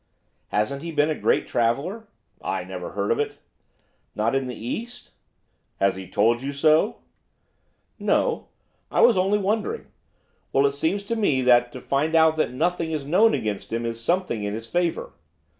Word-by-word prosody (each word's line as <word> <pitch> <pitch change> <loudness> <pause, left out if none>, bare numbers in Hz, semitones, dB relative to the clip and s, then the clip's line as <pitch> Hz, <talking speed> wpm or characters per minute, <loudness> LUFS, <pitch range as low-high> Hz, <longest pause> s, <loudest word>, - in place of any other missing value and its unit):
'Hasn't 130 +7 -1
he 170 +1 -5
been 150 0 +2
a - - -1
great - - +1
traveller?' 140 - -1 0.3
'I - - -2
never - - -7
heard - - -1
of 460 - +1
it.' 435 -1 -2 0.8
'Not 110 +3 0
in 135 -1 0
the 125 - -5
East?' 235 - -6 0.7
'Has 100 -1 +2
he 95 -1 -8
told 115 +5 +2
you 140 +1 -4
so?' 155 +7 +3 1.0
'No, - - +1 0.4
I - - +1
was 240 - +6
only 190 +3 +2
wondering. 220 - -2 0.6
Well, 135 +1 +4
it 140 - +3
seems 160 +8 -1
to 230 +3 -2
me 150 - +1
that 120 -1 +4
to 130 - -8
find 150 +4 0
out 160 -1 +5
that 155 - +1
nothing 165 +4 -1
is 150 -3 -3
known 200 +10 +4
against 105 -2 -4
him 115 +1 -2
is 115 0 -4
something 170 - 0
in 105 0 -2
his 115 +1 -6
favour! 175 +4 -1
150 Hz, 175 wpm, -24 LUFS, 120-185 Hz, 1.0 s, was